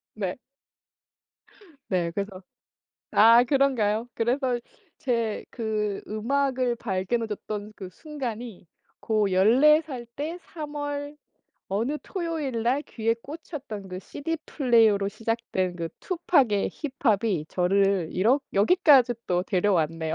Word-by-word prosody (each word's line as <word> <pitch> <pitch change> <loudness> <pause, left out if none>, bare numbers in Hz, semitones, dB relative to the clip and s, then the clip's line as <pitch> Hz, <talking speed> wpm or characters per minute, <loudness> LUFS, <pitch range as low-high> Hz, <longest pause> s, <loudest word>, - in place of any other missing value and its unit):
네. 195 -2 -3 1.5
네, 175 -3 0
그래서 195 +1 -5 0.7
아 230 +3 +7
그런가요? 245 -5 +1
그래서 245 +1 0 0.4
제 230 -4 -1
그 215 -3 -2
음악을 255 +2 0
발견해 225 +2 -2
줬던 210 0 -6
그 185 -2 -8
순간이 240 - -7 0.3
고 215 -3 +1
14 260 - +5
살 250 -6 -7
때 320 +5 -4
3 300 -3 -8
월 290 0 -4 0.5
어느 235 +10 -1
토요일날 290 - -1
귀에 230 -4 -1
꽂혔던 275 - -8
그 185 0 -6
시디플레이어로 235 - +1
시작된 220 -5 -2
그 165 -1 -3
투팍의 285 - +2
힙합이 225 - 0
저를 195 -1 +2
이렇 235 +10 +3
여기까지 255 - +5
또 180 0 +1
데려왔네요. 165 -5 0
230 Hz, 220 characters per minute, -26 LUFS, 200-275 Hz, 1.5 s, 아